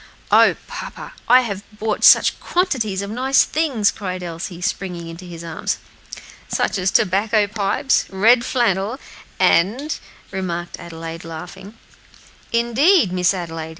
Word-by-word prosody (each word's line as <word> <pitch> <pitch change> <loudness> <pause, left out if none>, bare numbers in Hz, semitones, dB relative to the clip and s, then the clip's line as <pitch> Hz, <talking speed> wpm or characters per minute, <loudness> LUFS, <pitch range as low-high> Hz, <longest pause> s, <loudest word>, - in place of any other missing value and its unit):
"O - - +6
papa, - - -8 0.2
I 250 +1 +7
have 200 -5 -4 0.2
bought 215 0 -2
such - - +6
quantities 230 - -1
of 200 - -6
nice 260 +4 +3
things," 275 -10 +1
cried 185 -3 -5
Elsie, 170 +1 -6
springing 180 -2 -3
into 165 +2 -10
his 170 -1 -9
arms. 165 -1 -3 0.7
"Such - - -1
as 185 +1 +1
tobacco 210 +2 +2
pipes, 205 +5 0
red 225 +5 +4
flannel, 230 -1 0 0.4
et 170 - +5
cetera," 280 +6 -8 0.4
remarked 175 -2 -4
Adelaide, 165 0 -8
laughing. 180 +6 -9 0.7
"Indeed, 235 - +3
Miss 180 -1 +3
Adelaide!" 165 -4 -5
195 Hz, 130 wpm, -20 LUFS, 175-235 Hz, 0.7 s, I